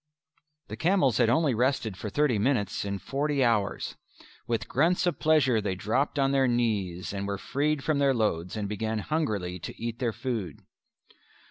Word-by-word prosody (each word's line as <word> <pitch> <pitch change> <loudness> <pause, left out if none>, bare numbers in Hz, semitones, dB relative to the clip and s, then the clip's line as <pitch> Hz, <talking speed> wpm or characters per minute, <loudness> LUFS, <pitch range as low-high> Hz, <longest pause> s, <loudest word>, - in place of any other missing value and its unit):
The - - -5
camels 160 - +2
had 120 -2 +4
only 140 +3 +3
rested 120 -3 0
for 105 - -5
thirty 135 -2 +1
minutes 105 -5 0
in 100 0 -2
forty 140 +5 -1
hours. 105 -4 0 0.5
With 115 -1 -1
grunts 170 +7 +2
of 175 -6 0
pleasure 130 -8 +3
they 100 -2 -2
dropped 120 +11 -1
on 135 -1 +2
their 135 -1 +3
knees 105 -7 -1
and 100 0 -3
were 100 0 -2
freed 145 +6 -1
from 155 -2 +1
their 140 -2 +3
loads, 90 -4 -1
and 105 -1 -2
began 110 +2 -2
hungrily 105 - -2
to - - -8
eat 115 0 -4
their 120 -3 0
food. 110 - -4
120 Hz, 170 wpm, -28 LUFS, 100-140 Hz, 0.5 s, had